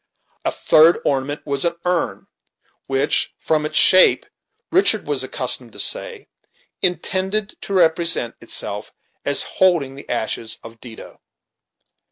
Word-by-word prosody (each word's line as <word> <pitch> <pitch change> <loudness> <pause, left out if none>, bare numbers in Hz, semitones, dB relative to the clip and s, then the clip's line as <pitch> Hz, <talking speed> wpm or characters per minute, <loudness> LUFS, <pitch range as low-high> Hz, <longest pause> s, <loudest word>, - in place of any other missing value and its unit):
A - - -1
third 160 +2 +4
ornament 140 +2 -2
was 140 -2 -2
an 170 0 -1
urn, 175 - -2 0.6
which; 135 +2 0
from 155 -1 -1
its 155 - -4
shape, 185 0 +6 0.5
Richard 375 +3 +3
was - - -1
accustomed - - -1
to - - -9
say, 470 -4 -1 0.5
intended 190 +3 -1
to 200 - -6
represent 165 -8 +2
itself - - -3 0.3
as - - +3
holding 170 -8 0
the 140 - -13
ashes 110 -1 -4
of 115 0 -13
Dido. 115 -3 -12
160 Hz, 125 wpm, -19 LUFS, 135-185 Hz, 0.6 s, shape